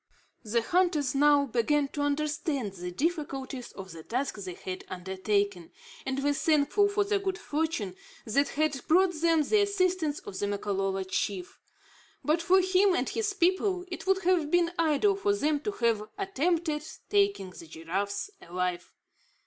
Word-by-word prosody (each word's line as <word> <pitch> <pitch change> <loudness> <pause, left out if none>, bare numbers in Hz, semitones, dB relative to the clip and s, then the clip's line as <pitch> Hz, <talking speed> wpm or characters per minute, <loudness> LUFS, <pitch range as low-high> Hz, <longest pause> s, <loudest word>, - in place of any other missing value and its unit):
The 230 +1 0
hunters 345 -3 +2
now 290 0 +5
began 275 +4 +1
to 290 - -4
understand 290 - -1
the 180 -1 -6
difficulties 275 - -3
of 190 -1 -9
the 165 - -9
task 255 - -2
they 185 -3 -6
had 185 0 -6
undertaken, 190 0 -2 0.4
and 265 +1 -1
were 290 0 +3
thankful 310 +7 +3
for 405 0 +1
the 405 0 0
good 380 -1 -2
fortune 300 - -2 0.3
that 275 +6 +2
had 300 -3 0
brought 365 +2 +4
them 330 -2 +4
the 420 +8 +3
assistance 370 -6 +1
of 190 - -7
the 205 - 0
Makololo 195 -1 -1
chief. 185 0 -3 0.6
But 310 +3 +2
for 375 +3 +5
him 375 +1 +3
and - - 0
his 420 -3 -1
people, 370 0 +1
it 355 - -6
would 385 0 +2
have 345 -4 +2
been 345 0 +3
idle 330 +5 +3
for 405 +1 +1
them 300 -5 +1
to 420 - -3
have 225 - 0
attempted 340 -5 0 0.3
taking 400 - +2
the 165 - -12
giraffes 195 - -3
alive. 180 0 -3
295 Hz, 155 wpm, -29 LUFS, -, 0.6 s, now